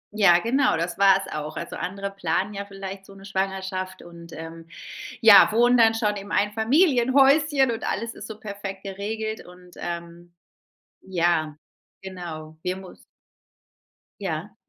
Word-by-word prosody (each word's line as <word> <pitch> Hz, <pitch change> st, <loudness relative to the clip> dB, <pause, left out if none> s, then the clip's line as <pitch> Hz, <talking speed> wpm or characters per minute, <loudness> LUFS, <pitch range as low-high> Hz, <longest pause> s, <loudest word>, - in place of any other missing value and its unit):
Ja, 195 Hz, -5 st, +6 dB
genau, 235 Hz, -, +2 dB
das 170 Hz, +3 st, -3 dB
war 195 Hz, -1 st, +6 dB
es 190 Hz, -, -10 dB
auch. 155 Hz, 0 st, -5 dB
Also -, -, -6 dB
andere 195 Hz, +2 st, -4 dB
planen 195 Hz, +2 st, -2 dB
ja 200 Hz, 0 st, -5 dB
vielleicht 195 Hz, -1 st, -8 dB
so 195 Hz, -, -15 dB
'ne 195 Hz, 0 st, -13 dB
Schwangerschaft 190 Hz, -1 st, -3 dB
und, 170 Hz, -1 st, -13 dB
ähm, 165 Hz, +1 st, -9 dB, 0.5 s
ja, 215 Hz, -3 st, +9 dB
wohnen 240 Hz, +3 st, +4 dB
dann 225 Hz, -2 st, +5 dB
schon 210 Hz, -2 st, 0 dB
im 200 Hz, +1 st, -9 dB
Einfamilienhäuschen 270 Hz, -, +3 dB
und 225 Hz, -, -5 dB
alles 230 Hz, 0 st, -2 dB
ist -, -, -9 dB
so 220 Hz, -, -8 dB
perfekt 200 Hz, -2 st, -7 dB
geregelt. 215 Hz, +3 st, -4 dB
Und, 180 Hz, 0 st, -16 dB
ähm, 170 Hz, 0 st, -7 dB, 0.7 s
ja, 170 Hz, -4 st, 0 dB, 0.5 s
genau, 170 Hz, -5 st, -8 dB
wir 180 Hz, 0 st, -1 dB
muss 190 Hz, -1 st, -13 dB, 1.2 s
Ja. -, -, -4 dB
195 Hz, 145 wpm, -24 LUFS, 175-220 Hz, 1.2 s, ja